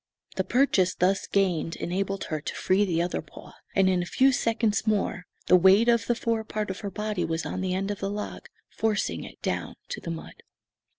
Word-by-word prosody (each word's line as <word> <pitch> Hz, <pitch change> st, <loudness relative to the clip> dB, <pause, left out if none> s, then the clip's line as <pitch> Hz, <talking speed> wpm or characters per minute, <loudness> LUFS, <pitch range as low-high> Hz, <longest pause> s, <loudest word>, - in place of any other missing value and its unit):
The -, -, +1 dB
purchase 210 Hz, -8 st, +2 dB
thus 190 Hz, +2 st, +1 dB
gained 180 Hz, -4 st, +1 dB
enabled 195 Hz, +2 st, -2 dB
her 155 Hz, -, -1 dB
to -, -, -5 dB
free 195 Hz, +2 st, +2 dB
the 170 Hz, -3 st, +1 dB
other 175 Hz, -, -2 dB
paw -, -, -13 dB, 0.2 s
and 195 Hz, -1 st, +4 dB
in 185 Hz, -1 st, +2 dB
a 175 Hz, -, -4 dB
few 265 Hz, +7 st, +4 dB
seconds 225 Hz, -3 st, 0 dB
more 200 Hz, -4 st, 0 dB, 0.2 s
the 180 Hz, -, +6 dB
weight 190 Hz, +5 st, +6 dB
of 235 Hz, -1 st, +3 dB
the 240 Hz, -, +2 dB
fore 230 Hz, -1 st, -1 dB
part 215 Hz, -2 st, -3 dB
of 190 Hz, -, -7 dB
her 205 Hz, -, -4 dB
body 210 Hz, -1 st, -2 dB
was 165 Hz, 0 st, -2 dB
on 185 Hz, -, -3 dB
the 185 Hz, -1 st, -1 dB
end 195 Hz, +2 st, -1 dB
of 205 Hz, -, -5 dB
the 195 Hz, -, -2 dB
log, 210 Hz, +1 st, -5 dB, 0.2 s
forcing 220 Hz, -1 st, -1 dB
it -, -, -11 dB
down -, -, -2 dB
to -, -, -5 dB
the -, -, -6 dB
mud. 165 Hz, -1 st, -7 dB
195 Hz, 215 wpm, -27 LUFS, 180-215 Hz, 0.2 s, the